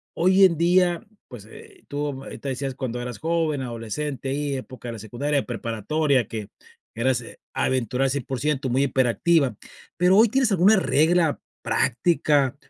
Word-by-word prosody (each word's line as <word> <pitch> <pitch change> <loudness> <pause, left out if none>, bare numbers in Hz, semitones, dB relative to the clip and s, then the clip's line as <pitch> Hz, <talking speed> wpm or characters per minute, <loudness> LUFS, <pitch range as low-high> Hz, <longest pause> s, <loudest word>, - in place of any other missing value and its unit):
hoy 185 +3 +4
en 170 -4 +2
día, 175 +1 +2 0.2
pues, - - -11
eh 440 -5 -15
tú, 145 -2 -4
ahorita 140 - -7
decías 135 0 -3
cuando 125 -3 -4
eras 125 -1 -6
joven, 160 -3 0
adolescente, 130 +4 -4
ahí 140 +1 -2
época 130 -2 -8
de - - -5
la 115 - -8
secundaria, 135 +7 -2
preparatoria, 120 +3 -1
que 110 -3 -6 0.5
eras, 125 +2 +1
eh, 115 - -13 0.2
aventura 130 0 0
al 135 - +1
100% 135 +1 -2
muy 130 +3 +2
hiperactiva, 135 +1 +2 0.4
pero 180 +2 +4
hoy 225 +1 +6
tienes 260 -1 +2
alguna 195 +3 +5
regla 165 -2 +2 0.2
práctica, 135 +1 +1
140 Hz, 150 wpm, -24 LUFS, 125-165 Hz, 0.5 s, hoy